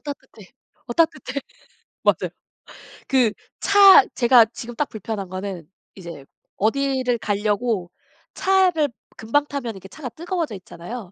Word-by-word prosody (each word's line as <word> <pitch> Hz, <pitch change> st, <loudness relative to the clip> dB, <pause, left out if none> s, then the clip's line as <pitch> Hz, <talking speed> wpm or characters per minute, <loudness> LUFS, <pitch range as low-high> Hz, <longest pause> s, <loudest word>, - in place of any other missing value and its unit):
따뜻해 270 Hz, -8 st, -10 dB, 0.4 s
어 240 Hz, -, -2 dB
따뜻해.' 280 Hz, -2 st, 0 dB, 0.6 s
맞아요. -, -, +1 dB, 0.8 s
그 250 Hz, -5 st, +3 dB, 0.3 s
차 400 Hz, 0 st, +8 dB
제가 240 Hz, -2 st, +6 dB
지금 240 Hz, +1 st, -8 dB
딱 295 Hz, +4 st, -1 dB
불편한 210 Hz, -3 st, -5 dB
거는 185 Hz, -4 st, -6 dB, 0.3 s
이제 170 Hz, -7 st, -10 dB, 0.3 s
어디를 255 Hz, +2 st, 0 dB
가려고 205 Hz, -2 st, -1 dB, 0.4 s
차를 370 Hz, -6 st, +2 dB, 0.3 s
금방 285 Hz, +7 st, +1 dB
타면 270 Hz, -5 st, -4 dB
이렇게 195 Hz, 0 st, -11 dB
차가 265 Hz, +2 st, -8 dB
뜨거워져 335 Hz, -, -4 dB
있잖아요. 185 Hz, +3 st, -9 dB
240 Hz, 265 characters per minute, -22 LUFS, 200-285 Hz, 0.8 s, 차